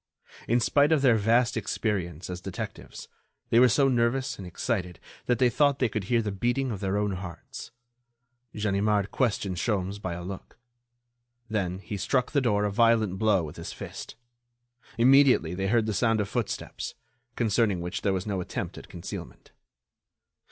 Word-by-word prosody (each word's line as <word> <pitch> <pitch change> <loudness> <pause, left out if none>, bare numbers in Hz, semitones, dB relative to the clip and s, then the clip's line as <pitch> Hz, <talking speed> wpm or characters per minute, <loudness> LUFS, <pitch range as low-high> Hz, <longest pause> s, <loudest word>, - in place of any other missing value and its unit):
In 120 +2 +3
spite 145 +5 +3
of 150 -3 +3
their 125 -4 +6
vast 115 +3 +2
experience 90 -6 -2
as 90 0 -6
detectives, - - -7 0.4
they 115 - +6
were 125 0 +7
so 135 +6 +4
nervous 130 +1 +1
and 95 - -7
excited 90 -2 -3 0.3
that 125 - +2
they 125 - +4
thought 140 +2 +3
they 125 -4 +1
could 105 -2 -3
hear 115 +1 +2
the 105 - -2
beating 120 +6 0
of 100 - -4
their 100 0 -1
own 105 0 0
hearts. 90 -2 -7 0.9
Ganimard 105 -1 +1
questioned 100 -7 0
Sholmes 100 0 -1
by 90 -3 -3
a 90 - -7
look. 95 +2 -8 0.9
Then 95 -4 -1
he 100 +1 -6
struck 125 +5 0
the 140 - +2
door 105 -4 +2
a 105 - 0
violent 110 -3 +3
blow 105 -5 +3
with 75 - -8
his - - -6
fist. - - -8 0.8
Immediately 130 - +5
they 95 +2 -2
heard 115 +1 +2
the 110 - -1
sound 115 +2 +2
of 105 - 0
footsteps, - - -4 0.4
concerning 110 -4 +1
which 90 +1 -4
there 100 - +1
was 95 -1 -2
no 100 -3 -2
attempt - - -5
at - - -14
concealment. 85 - -8
105 Hz, 170 wpm, -27 LUFS, 95-120 Hz, 0.9 s, were